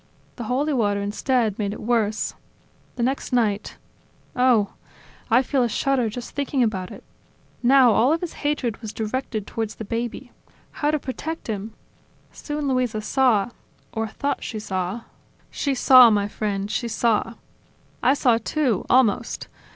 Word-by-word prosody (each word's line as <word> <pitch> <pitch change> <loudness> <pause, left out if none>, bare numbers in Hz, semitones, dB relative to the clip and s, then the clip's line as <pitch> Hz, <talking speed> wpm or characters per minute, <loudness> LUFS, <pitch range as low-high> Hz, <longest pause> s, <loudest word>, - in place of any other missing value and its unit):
"The 235 - -5
holy 280 +6 0
water, 205 -5 +1
instead, 220 +1 0
made 205 -1 -1
it - - -8
worse. 220 -2 0 0.6
The 240 - -2
next 265 +3 -1
night... 220 -5 0 0.6
Oh!... 250 -5 +3 0.6
I 245 +3 +5
feel 265 0 0
a 240 - +2
shudder 255 0 +1
just 240 +3 -7
thinking 280 -2 0
about 190 -5 -1
it. - - -11 0.6
Now 255 -1 +6
all 235 +6 +4
of 330 - +1
his 355 - -4
hatred 285 -7 -1
was 220 -2 -6
directed 220 -1 -3
towards 225 -1 -4
the 220 - -7
baby... 235 +3 -4 0.4
How 295 - -1
to 305 - +2
protect 300 +4 -5
him?... 215 +1 -4 0.6
Soon 295 -1 -4
Luisa 250 -4 0
saw.. 240 -2 +2 0.2
." - - -36
"Or 225 0 -2
she 215 - -14
thought 285 0 -2
she 220 - -5
saw.. 190 +1 -3 0.2
." - - -35
"She 280 -2 -1
saw, 255 -1 +8
my 205 -2 +1
friend, 205 -1 -3
she 240 - -1
saw... 230 0 0 0.7
I 260 +3 +4
saw 245 -5 +3
too, 245 -4 -1
almost. 245 -5 +2
235 Hz, 160 wpm, -23 LUFS, 215-260 Hz, 0.7 s, saw